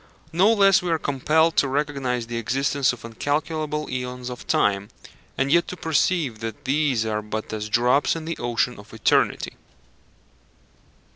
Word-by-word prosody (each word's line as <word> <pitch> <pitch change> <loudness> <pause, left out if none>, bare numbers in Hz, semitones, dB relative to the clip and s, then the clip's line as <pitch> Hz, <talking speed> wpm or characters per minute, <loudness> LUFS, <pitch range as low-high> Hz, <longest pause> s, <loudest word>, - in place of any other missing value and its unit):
No 190 +6 +5
less 200 -2 +5
are 175 -2 0
we - - +2
compelled 155 +3 +1
to 140 - +4
recognize 135 -4 -1
the 120 0 -5
existence 135 +3 +1
of 125 -2 -9
incalculable 150 +5 -2
æons 125 0 -5
of 125 - -9
time, 100 0 +1 0.5
and 135 +2 0
yet 170 +1 +4
to 180 - -6
perceive 160 -6 0
that 115 +1 -6
these 135 -4 +1
are 105 -1 -1
but 110 +1 -5
as 105 0 -4
drops 125 +8 +3
in 160 -1 -6
the 165 0 -4
ocean 120 0 -1
of 105 +2 -13
eternity. 110 - +1
135 Hz, 155 wpm, -23 LUFS, 115-155 Hz, 0.5 s, No